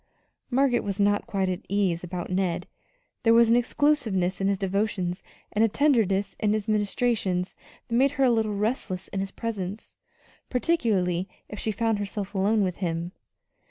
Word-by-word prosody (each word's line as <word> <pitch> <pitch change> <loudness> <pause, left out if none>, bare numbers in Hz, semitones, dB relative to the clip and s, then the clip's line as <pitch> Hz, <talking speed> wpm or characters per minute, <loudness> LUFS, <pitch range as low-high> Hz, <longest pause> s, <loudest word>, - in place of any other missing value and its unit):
Margaret 255 -1 +3
was 200 0 -3
not 205 0 +2
quite 195 -2 0
at 185 -1 -2
ease 190 -4 +1
about 180 0 -5
Ned. 180 -2 0 0.6
There 230 -1 +5
was 230 -1 +6
an - - +6
exclusiveness 230 -8 +1
in 195 - +2
his 200 0 +1
devotions, 195 -2 -1 0.3
and 210 - +2
a - - +6
tenderness 205 -7 +2
in 210 -1 +2
his 215 0 -2
ministrations 205 -3 0 0.3
that 235 - -6
made 265 +4 +4
her 275 - +3
a 255 - +5
little 220 -2 +1
restless 200 -3 -2
in 195 - -3
his 195 0 -2
presence, 205 -2 -5 0.5
particularly 210 - +1 0.2
if 210 - -7
she 220 - -1
found 225 -1 0
herself 205 0 -4
alone 205 +2 +2
with 180 -2 -2
him. 170 -1 -2
205 Hz, 165 wpm, -26 LUFS, 190-230 Hz, 0.6 s, was